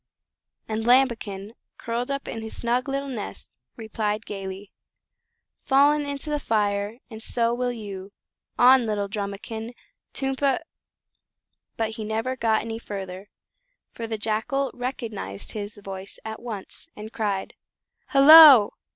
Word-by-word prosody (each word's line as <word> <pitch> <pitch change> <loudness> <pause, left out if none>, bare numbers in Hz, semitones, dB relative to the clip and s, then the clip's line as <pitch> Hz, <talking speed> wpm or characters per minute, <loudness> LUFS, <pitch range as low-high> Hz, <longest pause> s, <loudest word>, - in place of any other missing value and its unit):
And 220 0 -2
Lambikin, 225 -5 +2 0.2
curled 235 +2 -3
up 275 0 -3
in 225 - -5
his 220 0 -6
snug 245 +3 -1
little 275 +1 -2
nest, 240 -6 -7 0.2
replied 220 -1 -3
gaily: 195 0 -7 0.9
"Fallen 290 +2 +3
into 285 +2 -5
the 295 - 0
fire, 205 -2 -1
and 220 0 -9
so 235 0 0
will 245 0 -1
you 200 -4 -8 0.5
On 250 -1 +6
little 205 -2 -1
Drumikin! 220 +3 -5 0.4
Tum 270 0 -2
pa 275 -1 +1 0.6
" - - -57
But 220 -1 -2
he 220 - -4
never 225 +4 -2
got 225 -3 +1
any 225 0 -5
further, 195 -2 -7 0.6
for 230 - -6
the 220 -1 -3
Jackal 225 +6 -1
recognised 225 - -5
his 210 0 -6
voice 195 -1 -8
at 220 0 -6
once, 220 +4 -5
and 215 +1 -9
cried: 205 -5 -2 0.6
"Hullo! 280 -5 +9
225 Hz, 135 wpm, -25 LUFS, 205-255 Hz, 0.9 s, Hullo